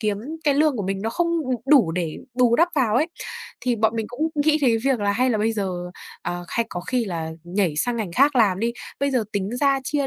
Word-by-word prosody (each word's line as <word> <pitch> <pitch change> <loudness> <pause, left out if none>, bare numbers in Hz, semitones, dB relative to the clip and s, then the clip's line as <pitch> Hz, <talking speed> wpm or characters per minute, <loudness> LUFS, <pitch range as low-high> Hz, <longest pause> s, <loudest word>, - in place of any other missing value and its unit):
kiếm 210 -2 0 0.3
cái 290 -2 +3
lương 300 -1 +3
của 210 - -2
mình 195 0 -2
nó 225 - -1
không, 345 +7 0 0.2
ừm, 255 -1 0
đủ 260 - +5
để 170 -3 -3 0.2
bù 245 -2 +4
đắp 340 +2 +4
vào 240 -7 +2
ấy." 305 +6 +3 0.5
Thì 245 -2 0
bọn 220 0 +2
mình 220 -1 -2
cũng 280 +7 -1 0.2
nghĩ 310 0 +4
thế 235 -4 +4
việc 265 -4 +2
là 200 0 +1
hay 255 +4 +2
là 220 - +1
bây 220 +2 +1
giờ, 185 -4 -3 0.3
à, 175 0 -3
hay 230 -1 -1
có 175 - -5
khi 245 +5 -1
là 165 -5 -4
nhảy 175 -3 0
sang 240 +10 0
ngành 205 -7 -3
khác 275 +3 +4
làm 200 -6 +4
đi, 235 +1 0 0.3
bây 280 0 +1
giờ 250 -5 +1
tính 200 0 -2
ra 275 0 +2
chia 280 0 0
230 Hz, 250 wpm, -23 LUFS, 195-270 Hz, 0.5 s, đủ